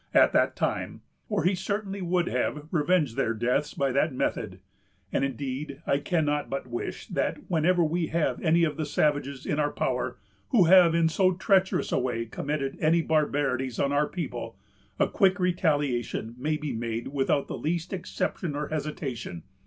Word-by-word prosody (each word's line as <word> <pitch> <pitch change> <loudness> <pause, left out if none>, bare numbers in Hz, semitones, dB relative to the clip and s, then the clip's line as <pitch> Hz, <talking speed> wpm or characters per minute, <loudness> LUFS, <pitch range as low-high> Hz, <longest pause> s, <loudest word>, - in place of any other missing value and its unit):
at - - +6
that - - +3
time, - - -2 0.3
or 205 -6 0
he 180 +3 +3
certainly 200 +1 -3
would 175 0 +1
have 150 -4 -1
revenged 155 -5 +2
their 115 -4 0
deaths 125 +6 0
by 140 -1 +1
that 140 +4 +2
method; 105 -6 -2 0.5
and, - - +1
indeed, 135 +1 -4
I 140 - +2
cannot 150 -2 0
but 135 - -3
wish 120 -1 -5
that - - -1
whenever 175 +2 +3
we 165 +1 0
have 165 0 0
any 170 0 +3
of 155 -3 0
the 155 - -1
savages 145 -2 0
in 150 - -1
our 145 -1 +2
power, - - -2 0.3
who 230 -8 +5
have 175 -1 +7
in 165 -1 +4
so 185 +3 +3
treacherous 190 +1 +2
a - - +2
way 120 -2 -1
committed 140 +4 -3
any 165 +2 +3
barbarities 140 -5 0
on 140 - +1
our 145 +1 +2
people, 180 - -5 0.4
a - - +4
quick 195 -3 +2
retaliation 145 -10 0
may 150 +5 -1
be 150 -3 -4
made 115 0 -3
without 140 0 +1
the - - -4
least 165 +3 -2
exception 175 -3 -3
or 150 0 -3
hesitation. 140 - -4
150 Hz, 170 wpm, -27 LUFS, 135-170 Hz, 0.5 s, have